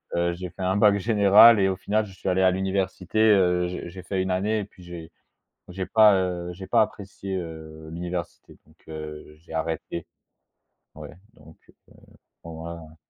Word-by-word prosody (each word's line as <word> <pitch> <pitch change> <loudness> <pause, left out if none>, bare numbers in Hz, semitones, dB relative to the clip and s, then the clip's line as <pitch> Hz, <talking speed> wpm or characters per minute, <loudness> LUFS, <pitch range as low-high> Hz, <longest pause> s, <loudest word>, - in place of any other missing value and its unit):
heu - - -1
heu, - - -2
j'ai 90 +1 -7
fait 95 - -12
un 95 +1 0
bac 105 -1 +5
général 105 +1 +6
et 95 - +3
au 95 - 0
final, 105 +3 -1
je 100 - -13
suis 95 - -3
allé 95 +1 +1
à 95 0 +5
l'université, 95 +1 -2
heu, 90 -5 +4
j'ai 90 -1 -6
j'ai 90 +2 -10
fait 95 +2 -2
une 95 0 -2
année 105 +4 0
et - - -3
puis 100 -1 -16
j'ai 85 -2 -10 0.6
j'ai 95 +1 -5
pas, 110 -2 +6
heu, 90 -2 -2
j'ai 95 +2 -9
pas 115 +2 +4
apprécié, 100 -2 -5
heu, 80 -2 -8
l'université, 85 0 -6
donc - - -23
heu, 75 -1 -8
j'ai 80 +1 -16
arrêté 80 +1 -4 0.9
ouais, - - -10 0.2
donc 80 -8 -17
heu, - - -20 0.7
bon 85 - -10
bon, 80 - -9
voilà, 85 0 -7
hein. 80 0 -15
90 Hz, 195 wpm, -25 LUFS, 85-100 Hz, 0.9 s, général